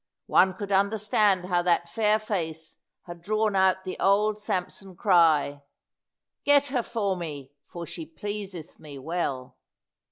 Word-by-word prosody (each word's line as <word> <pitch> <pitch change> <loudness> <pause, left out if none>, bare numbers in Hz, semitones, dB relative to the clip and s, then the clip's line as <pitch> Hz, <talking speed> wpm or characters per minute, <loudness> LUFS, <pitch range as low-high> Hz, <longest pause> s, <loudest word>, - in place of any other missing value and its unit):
One 185 0 +3
could 200 +1 -6
understand 200 -1 +2
how 180 -1 +1
that 175 -1 +1
fair 215 +2 +2
face 165 -7 -5 0.3
had 175 -1 -10
drawn 215 +2 0
out 190 0 +3
the 185 - -6
old 210 +2 +2
Samson 185 -1 -4
cry, 160 -7 +3 0.8
"Get 285 0 +4
her 255 -2 0
for 210 -5 -2
me, 145 -6 -7 0.2
for 170 -1 -7
she 160 0 -7
pleaseth 190 0 -7
me 145 -2 -10
well." 135 -3 -4
185 Hz, 135 wpm, -26 LUFS, 165-210 Hz, 0.8 s, Get